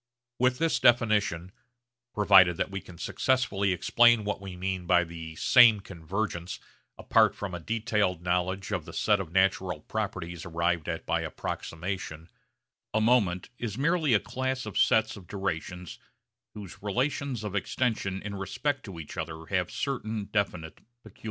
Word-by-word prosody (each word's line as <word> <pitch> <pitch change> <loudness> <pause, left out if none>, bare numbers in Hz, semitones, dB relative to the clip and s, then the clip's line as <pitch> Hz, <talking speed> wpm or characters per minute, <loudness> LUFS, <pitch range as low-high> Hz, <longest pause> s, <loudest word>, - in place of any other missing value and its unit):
With 125 0 +3
this 165 +2 +1
definition 105 -7 +2 0.6
(provided 95 -4 +6
that - - -2
we 95 0 -4
can 85 - -13
successfully 105 -3 0
explain 120 +5 +4
what 105 -1 -3
we 95 -2 -7
mean 95 -1 -3
by 90 -1 +5
the 80 -1 -8
'same 120 +3 +6
convergence' 90 0 -4 0.4
apart - - +3
from 100 -3 -5
a 90 - -4
detailed 105 -3 -1
knowledge 90 +2 -1
of - - -2
the - - -10
set 105 -2 +2
of 90 -4 -5
natural 95 -3 +1
properties 90 -5 -4
arrived 85 -1 -1
at - - -4
by - - 0
approximation) 85 -2 -5 0.7
a - - +4
moment 110 -6 +2
is 115 -2 -4
merely 155 -3 +2
a - - +4
class 130 +2 -3
of 105 - -7
sets 110 0 +3
of 95 -4 -13
durations 90 -2 -4 0.6
whose 100 -4 -10
relations 125 +3 -1
of 105 -2 -4
extension 100 -2 -1
in 105 0 -5
respect 130 +9 -2
to 95 -6 -8
each 80 - -9
other 80 0 -5
have 90 -2 +1
certain 110 -6 -3
definite 90 -6 -2 0.2
peculiarities. 110 - -16
95 Hz, 150 wpm, -28 LUFS, 90-110 Hz, 0.7 s, provided